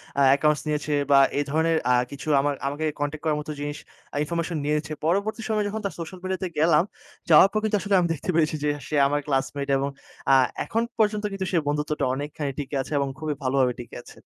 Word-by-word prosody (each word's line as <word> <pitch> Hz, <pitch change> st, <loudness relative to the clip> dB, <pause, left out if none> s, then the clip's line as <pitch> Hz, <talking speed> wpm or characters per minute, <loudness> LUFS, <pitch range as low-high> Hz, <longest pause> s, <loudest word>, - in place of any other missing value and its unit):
অ্যা 140 Hz, -, +3 dB
accounts 150 Hz, +1 st, +3 dB
নিয়েছে, 150 Hz, 0 st, -1 dB, 0.2 s
বা 140 Hz, -, +8 dB, 0.2 s
এই 145 Hz, -, +2 dB
ধরনের 160 Hz, +2 st, +2 dB
আ -, -, +5 dB, 0.2 s
কিছু 140 Hz, +2 st, -8 dB
আমা 145 Hz, +1 st, +1 dB, 0.2 s
আমাকে 145 Hz, +3 st, -2 dB
কনট্যাক্ট 145 Hz, +1 st, -3 dB
করার 150 Hz, -1 st, +1 dB
মতো 150 Hz, -, -6 dB
জিনিস 145 Hz, +1 st, -4 dB, 0.5 s
ইনফরমেশন 170 Hz, +1 st, -2 dB
নিয়েছে। 150 Hz, +1 st, -1 dB
পরবর্তী 200 Hz, +6 st, 0 dB
সময়ে 210 Hz, -1 st, +1 dB
যখন 215 Hz, +1 st, -4 dB
তার 195 Hz, -, -2 dB
সোশ্যাল 175 Hz, +3 st, -7 dB
মিডিয়াতে 185 Hz, 0 st, -2 dB
গেলাম, 160 Hz, 0 st, +5 dB, 0.5 s
যাওয়ার 170 Hz, +5 st, +8 dB
পর 215 Hz, -, +1 dB
কিন্তু 215 Hz, -1 st, +1 dB
আসলে 205 Hz, -1 st, +1 dB
আমি 175 Hz, -, +2 dB
দেখতে 165 Hz, -, -7 dB
পেয়েছি, 155 Hz, -1 st, +2 dB
যে, 150 Hz, -, +2 dB, 0.2 s
সে 155 Hz, -, -3 dB
আমার 145 Hz, +1 st, 0 dB
ক্লাসমেট, 140 Hz, 0 st, -1 dB
এবং 140 Hz, +1 st, -1 dB, 0.4 s
আ -, -, +8 dB, 0.3 s
এখন 225 Hz, -, 0 dB, 0.2 s
পর্যন্ত 210 Hz, -1 st, +2 dB
কিন্তু 195 Hz, -1 st, -3 dB
সে 180 Hz, -, +2 dB
বন্ধুত্বটা 150 Hz, 0 st, 0 dB
অনেকখানি 145 Hz, +1 st, -4 dB
টিকে 145 Hz, 0 st, -4 dB
আছে, -, -, -9 dB
এবং 140 Hz, -1 st, 0 dB
খুবই 155 Hz, -1 st, -2 dB
ভালোভাবে 130 Hz, -1 st, +2 dB
টিকে 120 Hz, -, -12 dB
আছে। -, -, -15 dB
150 Hz, 205 wpm, -25 LUFS, 145-180 Hz, 0.5 s, বা